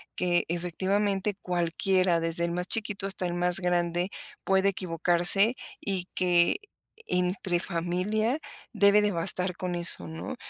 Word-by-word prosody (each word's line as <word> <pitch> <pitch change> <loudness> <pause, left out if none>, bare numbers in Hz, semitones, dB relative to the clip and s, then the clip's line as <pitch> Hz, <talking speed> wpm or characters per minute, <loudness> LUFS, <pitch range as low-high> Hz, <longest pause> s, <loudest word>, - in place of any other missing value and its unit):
Que 175 -1 +1
efectivamente, 195 +4 -1
cualquiera, 180 0 +1
desde 165 +1 -1
el 170 - -3
más 180 +1 -3
chiquito, 210 -2 -2
hasta 195 -1 -1
el 175 - -4
más 180 +1 +3
grande, 175 0 0 0.3
puede 195 0 +2
equivocarse. 180 +3 +2 0.3
Y 190 -3 -3
que 175 - +3 0.5
entre 180 0 0
familia, 190 - -1 0.3
debe 205 -1 +5
de 210 - +1
bastar 180 +1 0
con 180 -1 -3
eso, 170 0 +4
¿no? 160 +10 -6
180 Hz, 130 wpm, -27 LUFS, 175-195 Hz, 0.5 s, debe